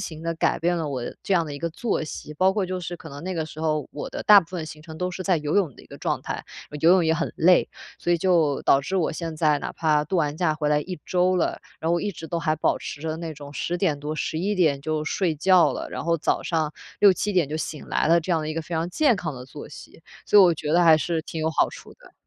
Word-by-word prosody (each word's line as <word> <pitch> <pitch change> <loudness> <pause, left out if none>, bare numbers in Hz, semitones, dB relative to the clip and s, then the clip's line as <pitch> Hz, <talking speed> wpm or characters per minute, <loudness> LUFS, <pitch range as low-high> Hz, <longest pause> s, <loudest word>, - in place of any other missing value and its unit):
行 160 -1 -6
地 165 0 -2
改 - - +1
变 175 +1 +1
了 160 -3 -2
我 130 -4 -3 0.2
这 195 - -2
样 170 -2 +3
的 145 - -6
一 145 - -6
个 170 - -2
作 215 +1 -2
息， 150 0 -7
包 185 +4 +3
括， 205 -2 0
就 185 0 -3
是 175 0 -5
可 - - -11
能 140 +2 -9
那 185 0 -4
个 160 -1 -1
时 155 +1 -10
候 155 -3 -1
我 145 - -5
的 - - -5
大 205 -1 +8
部 165 - -11
分 175 -4 -4
行 155 -1 -10
程 160 -1 -10
都 180 0 -1
是 185 +1 -5
在 185 -2 +2
游 150 -1 -2
泳 170 -10 +1
的 - - -14
一 - - -17
个 - - -11
状 - - -1
态， - - -5 0.4
游 165 - +5
泳 180 -2 +5
也 160 - +3
很 - - -2
累， 180 +3 +4 0.3
所 175 - 0
以 - - +4
就 165 -6 +2
导 135 - +4
致 190 +7 -3
我 165 -3 +1
现 165 -1 -5
在 150 -2 +2
哪 - - -5
怕 150 -2 +1
度 185 +5 -2
完 150 -2 0
假 160 -3 +1
回 150 -1 -1
来 150 0 +3
1 180 0 -6
周 185 0 +2
了， 175 - 0 0.2
然 165 - -1
后， 170 - +2
一 205 - -2
直 165 -3 -9
都 170 +1 -2
还 155 -2 0
保 - - +1
持 145 - -7
着 160 0 -3
那 165 -1 -5
种 145 0 -10
10 175 +4 -2
点 160 -7 +1
多、 150 +2 -4
11 175 +7 -2
点 155 -7 +2
就 155 +1 -2
睡 170 0 0
觉 180 +3 +4
了， - - -5
然 - - -5
后 170 0 +2
早 155 - 0
上 155 -3 -1 0.3
6、7 205 +1 +4
点 175 -6 +2
就 155 - -3
醒 155 -1 -5
来 - - +1
了， 170 +1 +5
这 175 +2 -2
样 160 - +2
的 155 - -4
一 155 - -3
个 165 - -2
非 170 +1 -6
常 165 +2 -1
健 275 - +3
康 160 -3 -4
的 125 0 -9
作 145 +3 -10
息， 160 - -13 0.2
所 210 - +6
以 200 - +10
我 175 -2 +6
觉 150 0 -3
得 175 +1 +5
还 160 -2 +7
是 165 -1 -1
挺 160 - -6
有 160 - +1
好 - - +2
处 - - -12
的。 - - -19
165 Hz, 305 characters per minute, -24 LUFS, 155-180 Hz, 0.4 s, 以